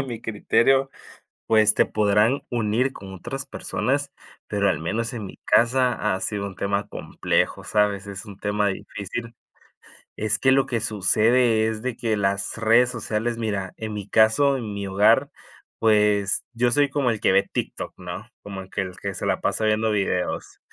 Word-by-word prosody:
a - - 0
mi 120 -4 -6
criterio, 135 +5 +2 0.6
pues 110 -1 +5
te - - +3
podrán 105 +5 +2
unir 120 +3 0
con 95 -5 -11
otras 125 +9 -5
personas, 140 +1 -2 0.3
pero 100 -1 0
al 85 -6 0
menos 110 +9 -2
en 110 -5 -6
mi - - -12
casa 120 -3 +2
ha 95 - -4
sido 100 0 -2
un 95 - -8
tema 100 +2 -2
complejo, - - -2
¿sabes? 105 -2 0
Es 100 +1 -7
un 100 -2 -11
tema 105 0 0
difícil. 110 +4 -6 0.8
Es 110 0 +1
que 130 - +3
lo 135 0 +3
que 120 - -2
sucede 110 +3 +3
es 110 0 -4
de 130 -2 -2
que 115 -3 -1
las 100 +1 0
redes 115 +2 +4
sociales, 115 -1 -2
mira, 100 -5 -3
en 110 -1 -5
mi 105 -2 -6
caso, 115 +6 +4
en 110 -5 -6
mi 100 -1 -4
hogar, 100 +2 +3 0.5
pues 105 -2 +2
yo 120 +1 +1
soy 145 +3 +4
como 135 -3 0
el 110 - -3
que - - +2
ve 95 +1 +3
TikTok, - - -4
¿no? 90 +4 -8
Como 100 -2 -7
el 95 - -13
que - - -2
el 90 -1 -6
que 100 -1 -4
se - - -4
la - - 0
pasa 110 - 0
viendo 110 +1 +1
videos. 95 -3 -2
110 Hz, 180 wpm, -23 LUFS, 100-120 Hz, 0.8 s, pues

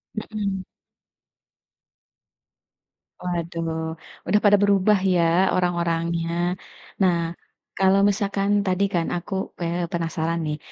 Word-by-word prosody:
Mhm. 205 -3 -3 2.6
Waduh, 165 -2 -3 0.3
udah 210 - +4
pada 205 0 +7
berubah 200 0 +4
ya 170 +2 +3
orang-orangnya. 170 0 0 0.5
Nah, 180 -2 +4 0.6
kalau 190 +1 +4
misalkan 200 0 0 0.2
tadi 185 +1 +1
kan 170 -2 +1
aku, 175 +3 -5 0.3
eee, 170 0 -1
penasaran 165 0 -1
nih, 150 0 -2
175 Hz, 90 wpm, -23 LUFS, 170-195 Hz, 2.6 s, pada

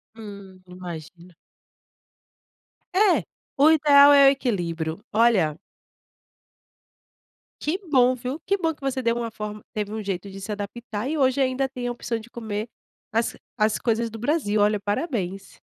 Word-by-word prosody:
Hum, 200 -4 -11
imagina. 175 -1 -10 1.6
É, 385 -1 +4 0.3
o 300 +3 +6
ideal 285 -2 +7
é 280 -1 +8
o - - +9
equilíbrio, 170 - -2
olha 205 -9 +3 2.1
Que 315 +5 0
bom 255 -1 +5
viu, 255 +5 -5
que 395 +1 +1
bom 325 -3 0
que 295 - -26
você 265 -1 -2
deu 230 0 +2
uma 235 -1 -3
forma 210 -1 -7
teve 210 0 -4
um 220 -1 -4
jeito 195 0 -4
de 195 0 -9
se 210 - -5
adaptar, 210 +2 -5
e 315 - -1
hoje 270 -1 +2
ainda 265 0 +1
tem 250 -2 -5
a - - -1
opção 240 -1 -3
de 225 +1 -11
comer 220 -2 -5 0.5
as 230 +1 0 0.2
as 215 -1 +2
coisas 230 0 0
do 225 - -8
Brasil, 235 -5 0
olha 210 0 +3
parabéns. 205 - -3
225 Hz, 155 wpm, -24 LUFS, 200-265 Hz, 2.1 s, o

